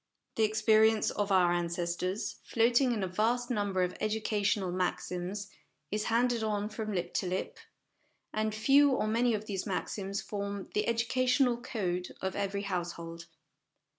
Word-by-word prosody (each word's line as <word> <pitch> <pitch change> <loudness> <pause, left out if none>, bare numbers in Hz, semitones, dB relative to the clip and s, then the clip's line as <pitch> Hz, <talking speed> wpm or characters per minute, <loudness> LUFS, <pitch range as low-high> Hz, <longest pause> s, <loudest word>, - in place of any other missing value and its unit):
The 225 - +1
experience 220 0 +4
of 205 -1 -1
our 180 -2 +5
ancestors, 175 +3 -2
floating 240 +3 +3
in 215 -4 -1
a - - 0
vast 235 +7 0
number 200 -5 +1
of 180 - -2
educational 210 -3 0
maxims, 185 +2 -3 0.4
is 210 +1 -1
handed 235 0 +2
on 210 -1 -1
from 215 0 -4
lip 180 -3 -2
to 185 - 0
lip; 185 +1 -3 0.7
and 215 0 -1
few 275 +5 +5
or 255 - +1
many 230 +2 +2
of 210 0 -5
these 195 -2 -3
maxims 195 +1 -3
form 200 -1 -5
the 210 - 0
educational 250 +2 +2
code 180 -8 -3
of 190 0 -3
every 200 0 -2
household. 170 -3 -4
210 Hz, 145 wpm, -31 LUFS, 185-225 Hz, 0.7 s, our